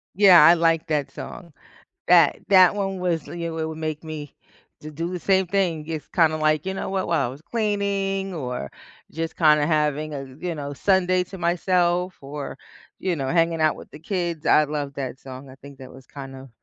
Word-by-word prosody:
Yeah, 190 Hz, -3 st, +8 dB
I 170 Hz, -, +8 dB
like 165 Hz, -1 st, +1 dB
that 145 Hz, -3 st, -1 dB
song. 170 Hz, +1 st, -9 dB, 0.5 s
That -, -, +5 dB
that 185 Hz, 0 st, +6 dB
one 195 Hz, -2 st, -2 dB
was 175 Hz, -3 st, -1 dB
you 170 Hz, -1 st, -5 dB
w 160 Hz, -1 st, -3 dB
would 160 Hz, 0 st, -7 dB
make 155 Hz, 0 st, -4 dB
me 150 Hz, -3 st, -7 dB, 0.5 s
to 155 Hz, 0 st, -8 dB
do 165 Hz, +3 st, -4 dB
the 180 Hz, -, -4 dB
same 190 Hz, -1 st, +2 dB
thing. 170 Hz, -5 st, -1 dB
It's, 160 Hz, -2 st, -5 dB
kinda, 160 Hz, -2 st, +2 dB
like, 155 Hz, +1 st, +1 dB
you 190 Hz, -, -2 dB
know, -, -, -4 dB
what 190 Hz, -1 st, -2 dB
while 165 Hz, -6 st, +1 dB
I -, -, -5 dB
was 135 Hz, +4 st, -10 dB
cleaning 200 Hz, -3 st, -2 dB
or 125 Hz, -, -5 dB, 0.4 s
just 165 Hz, +1 st, -4 dB
kinda 150 Hz, -2 st, +4 dB
having 150 Hz, -1 st, 0 dB
a, 135 Hz, -1 st, -5 dB
you 175 Hz, -2 st, -3 dB
know, 145 Hz, -2 st, -6 dB
Sunday 185 Hz, +2 st, +2 dB
to 195 Hz, -, -10 dB
myself 180 Hz, +1 st, 0 dB
or, 140 Hz, 0 st, -7 dB, 0.4 s
you 180 Hz, -3 st, -1 dB
know, 135 Hz, -3 st, -3 dB
hanging 165 Hz, -1 st, +1 dB
out 155 Hz, -1 st, +3 dB
with -, -, -12 dB
the 150 Hz, -, -11 dB
kids, 170 Hz, -2 st, -3 dB
I 150 Hz, -, +5 dB
love 145 Hz, -1 st, -4 dB
that 135 Hz, -1 st, -5 dB
song. 130 Hz, 0 st, -10 dB
I 130 Hz, -, -12 dB
think 140 Hz, 0 st, -14 dB
that 130 Hz, -1 st, -11 dB
was 130 Hz, -1 st, -15 dB
kind 135 Hz, -2 st, -10 dB
of 130 Hz, 0 st, -12 dB
160 Hz, 205 wpm, -23 LUFS, 145-180 Hz, 0.5 s, Yeah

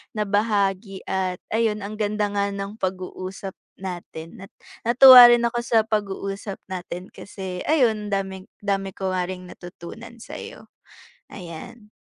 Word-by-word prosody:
nabahagi 205 Hz, -2 st, 0 dB
at, 185 Hz, -1 st, -1 dB
ayun, 220 Hz, -2 st, +1 dB
ang 210 Hz, +2 st, -6 dB
ganda 210 Hz, 0 st, 0 dB
nga 200 Hz, 0 st, 0 dB
ng 200 Hz, +2 st, -6 dB
pag-uusap 185 Hz, +1 st, -5 dB, 0.2 s
natin 175 Hz, -1 st, -8 dB
at -, -, -44 dB, 0.4 s
natuwa 250 Hz, 0 st, +11 dB
rin 240 Hz, 0 st, +4 dB
ako 240 Hz, 0 st, -2 dB
sa 225 Hz, -2 st, +4 dB
pag-uusap 200 Hz, -2 st, -3 dB
natin, 180 Hz, 0 st, -6 dB
kasi, 190 Hz, -3 st, -7 dB
ayun, 220 Hz, -9 st, +2 dB
daming 190 Hz, -1 st, -3 dB, 0.2 s
dami 195 Hz, -1 st, -1 dB
ko 190 Hz, -1 st, -3 dB
nga 180 Hz, -1 st, 0 dB
ring 180 Hz, -1 st, -7 dB
natutunan 190 Hz, +7 st, -11 dB
sa -, -, -8 dB
'yo. -, -, -11 dB, 0.6 s
Ayan. 205 Hz, +5 st, -10 dB
200 Hz, 135 wpm, -23 LUFS, 185-215 Hz, 0.6 s, natuwa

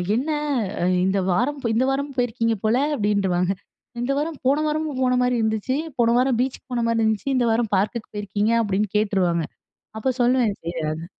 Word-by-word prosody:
"என்ன! 275 Hz, +7 st, -1 dB, 0.7 s
இந்த 195 Hz, +1 st, +1 dB
வாரம் 265 Hz, +10 st, 0 dB
இந்த 245 Hz, +3 st, +2 dB
வாரமு 280 Hz, +1 st, -2 dB
போயிருக்கீங்க 230 Hz, -2 st, +1 dB
போல" 220 Hz, +2 st, +3 dB, 0.2 s
அப்டின்றுவாங்க. 195 Hz, -5 st, +1 dB, 0.5 s
"இந்த 245 Hz, +3 st, 0 dB
வாரம் 305 Hz, 0 st, -3 dB
போன 290 Hz, +3 st, +3 dB
வாரமும் 305 Hz, -3 st, -2 dB
போன 250 Hz, 0 st, +2 dB
மாரி 250 Hz, 0 st, +1 dB
இருந்துச்சு. 220 Hz, +4 st, 0 dB, 0.2 s
போன 235 Hz, 0 st, +4 dB
வாரம் 255 Hz, -2 st, +2 dB
பீச்சுக்கு 260 Hz, 0 st, -3 dB
போன 240 Hz, -1 st, 0 dB
மாரி 230 Hz, 0 st, +1 dB
இருந்துச்சு, 220 Hz, +4 st, 0 dB
இந்த 245 Hz, -2 st, +2 dB
வாரம் 225 Hz, -1 st, 0 dB
பார்க்குக்கு 215 Hz, +4 st, -2 dB
போயிருக்கீங்க" 205 Hz, +2 st, -1 dB
அப்டின்னு 205 Hz, -1 st, 0 dB
கேட்டுருவாங்க. 180 Hz, -6 st, +1 dB, 0.5 s
அப்போ 240 Hz, +4 st, 0 dB
சொல்லுவே, 245 Hz, -1 st, +3 dB
சரி 170 Hz, +1 st, -5 dB
எதா 155 Hz, +2 st, -3 dB
230 Hz, 165 wpm, -23 LUFS, 205-255 Hz, 0.7 s, போன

